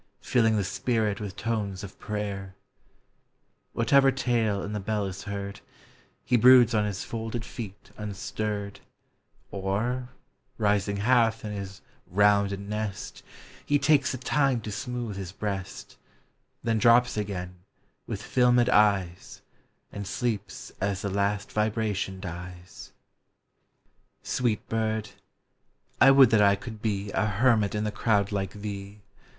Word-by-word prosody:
Filling 115 -3 +2
the 105 - +1
spirit 110 0 -1
with 100 -2 -6
tones 105 -5 -3
of 100 -1 -10
prayer, 100 -3 -4 0.6
— - - -46
Whatever 135 +4 +4
tale 115 -6 0
in 105 - -5
the 105 - -2
bell 105 +1 -1
is 95 +1 -6
heard, 100 0 -5 0.7
He 125 - +3
broods 125 0 +7
on 105 -1 +2
his 100 -2 -3
folded 115 0 -5
feet 105 -5 -9
unstirred, 105 0 -4 0.7
Or, 110 +6 -2 0.5
rising 100 -2 +1
half 115 0 +2
in 105 - -4
his 100 -2 -7 0.3
rounded 100 +1 +3
nest, 105 0 -5 0.4
He 145 - +2
takes 140 0 +3
the 130 - -3
time 135 -1 +1
to 110 - -6
smooth 120 -2 -4
his 95 -3 -5
breast, 100 -2 -5 0.7
Then 115 -1 +1
drops 120 +2 +5
again, 90 -4 -4 0.5
with - - -5
filmed 125 -1 +3
eyes, 100 -6 +1 0.5
And 100 -1 -6
sleeps 120 +4 -3
as 100 0 -1
the 100 - -2
last 100 +1 -1
vibration 105 -3 -1
dies. 90 -1 -9 1.3
Sweet 120 -4 -1
bird! 110 -1 -1 0.9
I 130 - +9
would 135 -3 +7
that 110 -2 +5
I 100 -1 +5
could 110 -1 -9
be 100 -2 -2
A 110 - +1
hermit 110 -1 +2
in 105 - -1
the 105 - -1
crowd 105 -1 +1
like 95 -2 -2
thee! 100 0 -7
105 Hz, 135 wpm, -27 LUFS, 100-115 Hz, 1.3 s, I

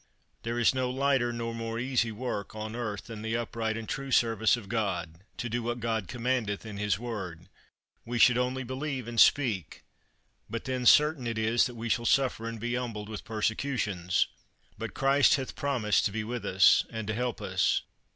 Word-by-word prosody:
There 115 +1 -3
is 120 +1 +4
no 130 -1 0
lighter 135 -2 +1
nor 115 0 -4
more 115 0 -4
easy 120 -2 0
work 110 -3 -4
on 110 +1 -5
earth 110 -4 -4
than 110 -2 -8
the 110 +1 -1
upright 115 -1 -2
and 115 -1 -6
true 135 0 -4
service 115 -2 +3
of 110 -5 -9
God, 95 -6 -2
to 120 - -3
do 120 +1 -2
what 120 +1 -3
God 110 -4 -1
commandeth 120 -4 -1
in 105 -2 -7
his 105 -2 0
Word; 95 -7 -6 0.5
we 120 +1 -3
should 120 +2 +6
only 125 +1 0
believe 130 0 -4
and 120 -1 -2
speak, 110 - +3 0.7
but 115 +1 -5
then 130 -1 -1
certain 150 -4 +5
it 115 -1 -2
is 115 +3 +3
that 125 - -9
we 115 0 -5
shall 115 0 0
suffer 130 -4 +2
and 115 -1 -7
be 120 +2 -2
humbled 115 -4 -3
with 105 -2 -6
persecutions; 110 -5 0 0.5
but - - -6
Christ 135 +1 +4
hath 135 -2 -4
promised 125 -9 +1
to - - +1
be 110 +1 -2
with 120 +2 -4
us, 95 +1 +6
and 110 -1 -5
to 110 - -2
help 125 +1 -2
us. - - +1
115 Hz, 190 wpm, -29 LUFS, 110-125 Hz, 0.7 s, should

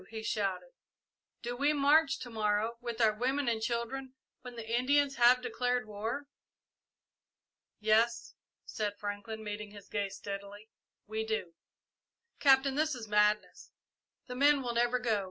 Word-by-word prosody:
he 220 -1 -6
shouted. 190 -5 -2 0.7
"Do 240 +1 -3
we 285 +4 +2
march 290 0 +4
to 245 - -7
morrow, 215 +1 0
with 235 -1 -5
our 220 -2 +4
women 260 +5 -1
and 225 -2 0
children, 255 +3 -3 0.3
when 250 -1 -9
the 230 -1 -7
Indians 275 +4 +2
have 245 +1 +5
declared 245 0 -1
war?" 220 +7 -4 1.5
"Yes," 220 +2 +2 0.3
said 205 -1 -3
Franklin, 205 +2 -5
meeting 210 0 -5
his 205 -1 -13
gaze 200 -2 -2
steadily, 200 +2 -8 0.3
"we 220 +1 -3
do." 220 -6 -3 0.9
"Captain, 270 -1 +5
this 305 +1 +1
is 230 -3 -8
madness. 210 0 +1 0.6
The 250 - -7
men 280 +2 +4
will 240 -1 -2
never 240 +1 +2
go. 230 -4 0
230 Hz, 140 wpm, -32 LUFS, 210-255 Hz, 1.5 s, have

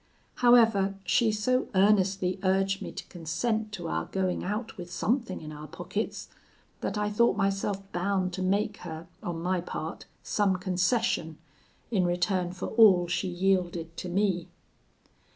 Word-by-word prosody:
However, 225 -5 +5
she 230 -2 +3
so 255 +5 +1
earnestly 190 -1 +3
urged 195 0 +1
me - - -5
to - - -7
consent 215 +6 -2
to 190 - -5
our 80 0 -1
going 185 -2 -1
out 210 +4 -3
with 175 -3 -8
something 225 +3 -1
in 155 -1 -8
our 150 0 -8
pockets, - - -4 0.5
that - - -3
I 210 0 0
thought 210 -1 +3
myself 195 0 0
bound 185 0 0
to 185 - -4
make 200 +2 0
her, 160 -1 -7 0.2
on 170 -2 -4
my 180 0 0
part, 160 -1 -6 0.2
some 200 -3 +1
concession, 185 -2 0 0.5
in 195 -5 +2
return 175 +1 0
for 180 - -5
all 195 -6 +6
she 180 +2 -1
yielded 175 -2 0
to 180 - -5
me. 185 -2 0
190 Hz, 150 wpm, -28 LUFS, 175-210 Hz, 0.5 s, all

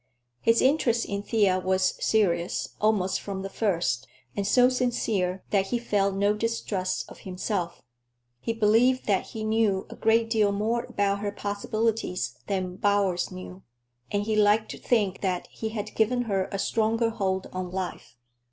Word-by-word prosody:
His 230 0 +3
interest 255 -4 +3
in 200 -1 -3
Thea 205 -4 +2
was 185 0 +1
serious, 180 -5 +1
almost 210 -3 +2
from 195 -1 -5
the 195 - -5
first, 175 - 0 0.3
and 200 -1 -1
so 250 -1 +6
sincere 220 -7 0
that 195 -2 +2
he 240 - 0
felt 200 -4 0
no 200 +1 +2
distrust 210 -4 -2
of - - -13
himself. 180 -2 -3 0.6
He 230 - -2
believed 230 +4 +3
that 195 -3 +1
he 220 - -6
knew 215 -3 +1
a - - -7
great 225 +1 +3
deal 215 -3 +2
more 220 +4 0
about 200 0 0
her 205 0 -2
possibilities 205 -1 -2
than 185 -2 -2
Bowers 200 -3 +1
knew, 185 0 -9 0.5
and 205 0 0
he 215 +1 -1
liked 215 +1 +3
to - - -8
think 210 -6 +1
that 185 -2 -1
he 220 - -4
had 215 -1 -5
given 245 +3 +2
her 195 -5 -1
a 195 - -2
stronger 225 +3 +1
hold 190 -4 -1
on 185 -1 -3
life. 185 -9 -5
205 Hz, 160 wpm, -27 LUFS, 190-225 Hz, 0.6 s, so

